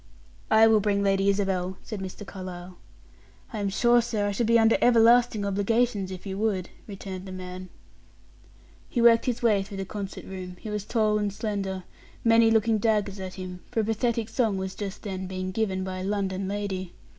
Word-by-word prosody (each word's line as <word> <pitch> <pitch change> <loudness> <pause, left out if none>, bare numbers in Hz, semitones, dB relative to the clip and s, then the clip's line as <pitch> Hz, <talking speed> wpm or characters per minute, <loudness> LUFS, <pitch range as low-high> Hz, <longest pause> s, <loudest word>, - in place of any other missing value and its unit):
"I 220 0 +7
will 220 -1 +5
bring 200 -1 +1
Lady 195 0 +2
Isabel," 190 -2 0
said 215 -3 -6
Mr. 190 +2 -7
Carlyle. 185 -2 -8 0.8
"I 215 - -3
am 200 -1 0
sure, 240 +4 +4
sir, 225 -3 -1
I - - 0
should 215 +3 0
be 230 0 +5
under 225 0 +5
everlasting 235 -2 +5
obligations 205 0 +1
if 185 0 -8
you 195 0 -4
would," 200 -5 -1 0.2
returned 195 -2 -7
the - - -7
man. 185 0 -7 1.2
He 245 - -2
worked 235 0 +5
his 245 -1 -1
way 210 -4 +4
through 195 0 -7
the 195 - -3
concert 200 0 -6
room 185 -1 -7
he 215 - -7
was 210 -1 -3
tall 215 -2 +1
and 205 -1 -1
slender 195 -3 -3 0.4
many 230 0 +5
looking 225 0 +3
daggers 205 -2 0
at 185 -1 -6
him, 185 -1 -7
for 225 - 0
a - - -2
pathetic 225 0 0
song 225 -7 0
was 190 0 -4
just 200 0 -6
then 190 -2 -4
being 185 0 -4
given 190 -2 -1
by 185 0 -4
a - - -4
London 195 -1 -1
lady. 195 -3 -3
200 Hz, 190 wpm, -26 LUFS, 190-225 Hz, 1.2 s, I